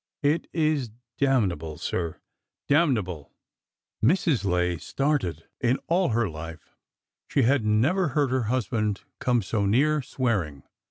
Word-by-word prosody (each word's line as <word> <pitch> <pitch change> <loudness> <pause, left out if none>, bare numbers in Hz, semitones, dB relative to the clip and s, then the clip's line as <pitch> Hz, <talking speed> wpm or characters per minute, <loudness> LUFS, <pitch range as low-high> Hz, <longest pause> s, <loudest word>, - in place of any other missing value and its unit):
It 150 +3 +1
is 155 -6 +1 0.3
damnable, 95 - +1
sir,— 85 -3 -3 0.5
damnable! 110 - +1 0.3
" - - -32
Mrs. 155 - +3
Lay 90 -3 +1
started. 135 - -1 0.2
In 125 +1 +2
all 175 0 +2
her 115 -1 +1
life 80 -1 -9 0.5
she 140 - +2
had 130 +1 +3
never 130 - +2
heard 145 -1 +1
her 130 -3 +1
husband 110 -5 0 0.2
come 120 -3 +1
so 100 +1 0
near 145 +8 +3
swearing. 105 - -2
120 Hz, 125 wpm, -26 LUFS, 90-140 Hz, 0.5 s, Mrs